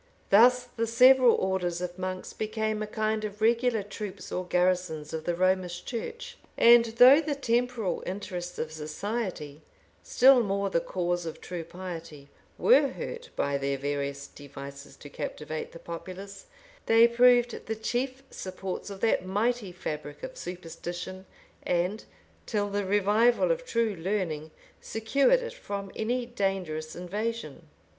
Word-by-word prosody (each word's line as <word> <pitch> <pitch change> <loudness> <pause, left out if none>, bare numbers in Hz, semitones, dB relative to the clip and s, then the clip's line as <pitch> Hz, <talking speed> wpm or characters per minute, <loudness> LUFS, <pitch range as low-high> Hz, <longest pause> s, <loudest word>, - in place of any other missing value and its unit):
Thus 245 +5 +6
the 230 -2 -3
several 250 +1 +6
orders 180 -2 -1
of 180 0 -5
monks 185 0 -4
became 215 0 -2
a 215 - -3
kind 215 0 -1
of 210 -1 -5
regular 230 0 +2
troops 205 0 -7
or 180 0 -3
garrisons 180 -4 0
of 160 -1 -4
the 175 - 0
Romish 180 -1 0
church; 450 - -6 0.2
and 235 0 +7
though 250 +6 +7
the 300 -2 -2
temporal 240 -5 0
interests 180 -2 -5
of 155 - -3
society, 155 -1 -4 0.4
still 260 0 +6
more 200 -2 -1
the 170 - +3
cause 175 -1 -2
of 160 - -6
true 175 -2 -6
piety, 165 -5 -8 0.3
were - - +5
hurt, 485 +1 -7
by 140 0 0
their 140 0 -1
various 140 0 -3
devices 140 0 -10
to - - -12
captivate 155 +2 -5
the - - -10
populace, 185 - -8 0.4
they 225 +1 +7
proved 245 0 +3
the 220 - -2
chief 255 +4 -2
supports 190 +1 -6
of 195 -1 -8
that 225 - +2
mighty 210 +2 -1
fabric 150 -4 -6
of - - -6
superstition, 175 +1 -7 0.3
and, 180 +5 -1 0.4
till 205 -2 -1
the 205 0 -1
revival 210 - +3
of - - -1
true 230 - 0
learning, 165 -4 -2 0.3
secured 275 - +2
it 480 0 -6
from 200 - -6
any 245 +3 -1
dangerous 190 -9 -3
invasion. 180 -3 -4
195 Hz, 140 wpm, -28 LUFS, 175-230 Hz, 0.4 s, and